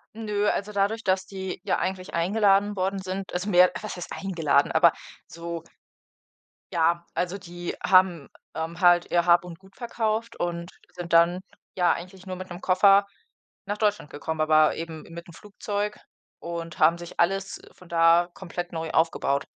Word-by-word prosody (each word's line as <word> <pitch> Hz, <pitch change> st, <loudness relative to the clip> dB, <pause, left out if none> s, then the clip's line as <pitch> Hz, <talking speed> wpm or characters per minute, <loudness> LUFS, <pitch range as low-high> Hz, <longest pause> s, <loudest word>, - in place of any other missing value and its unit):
Nö, 210 Hz, -2 st, -1 dB
also, 210 Hz, +1 st, -2 dB
dadurch, 205 Hz, +3 st, 0 dB
das 185 Hz, -1 st, +1 dB
die 190 Hz, -2 st, -6 dB
ja 205 Hz, -, 0 dB
eigentlich 185 Hz, -1 st, -4 dB
eingeladen 200 Hz, +3 st, +2 dB
worden 195 Hz, +1 st, -1 dB
sind, 190 Hz, +1 st, -5 dB
also, 180 Hz, +3 st, -2 dB
mehr 180 Hz, -1 st, +6 dB
was -, -, -6 dB
heißt 180 Hz, -, -8 dB
eingeladen, 165 Hz, -7 st, +1 dB
aber -, -, +5 dB, 0.4 s
so 170 Hz, 0 st, -7 dB, 1.1 s
Ja, 170 Hz, 0 st, +2 dB
also, 180 Hz, +2 st, -1 dB
die 175 Hz, -2 st, -7 dB
haben, 185 Hz, -6 st, +3 dB, 0.3 s
ähm, 165 Hz, +1 st, -4 dB
halt 175 Hz, -1 st, +4 dB
ihr 170 Hz, -1 st, +2 dB
Hab 175 Hz, 0 st, +5 dB
und 175 Hz, -2 st, -10 dB
Gut 190 Hz, 0 st, -21 dB
verkauft 230 Hz, -1 st, -3 dB
und 170 Hz, 0 st, -3 dB, 0.2 s
sind 175 Hz, -1 st, -7 dB
dann, 170 Hz, +2 st, +4 dB, 0.3 s
ja, 180 Hz, -2 st, +3 dB
eigentlich 185 Hz, +2 st, -6 dB
nur 185 Hz, -1 st, -6 dB
mit 185 Hz, 0 st, -8 dB
'nem 175 Hz, +1 st, -8 dB
Koffer 195 Hz, +2 st, +5 dB, 0.6 s
nach 205 Hz, +1 st, -2 dB
Deutschland 210 Hz, -7 st, 0 dB
gekommen, 160 Hz, +2 st, -5 dB
aber 155 Hz, 0 st, +4 dB
eben 165 Hz, -1 st, -6 dB
mit 170 Hz, 0 st, -11 dB
'nem 170 Hz, -, -13 dB
Flugzeug 205 Hz, +2 st, -4 dB, 0.4 s
und 170 Hz, -1 st, -6 dB
haben 165 Hz, +2 st, +5 dB
sich 175 Hz, 0 st, -11 dB
alles 195 Hz, +3 st, 0 dB
von 180 Hz, -, -18 dB
da 170 Hz, +1 st, +4 dB
komplett 175 Hz, -1 st, -6 dB
neu 165 Hz, -1 st, -4 dB
aufgebaut. 140 Hz, -4 st, +1 dB
180 Hz, 165 wpm, -25 LUFS, 170-195 Hz, 1.1 s, mehr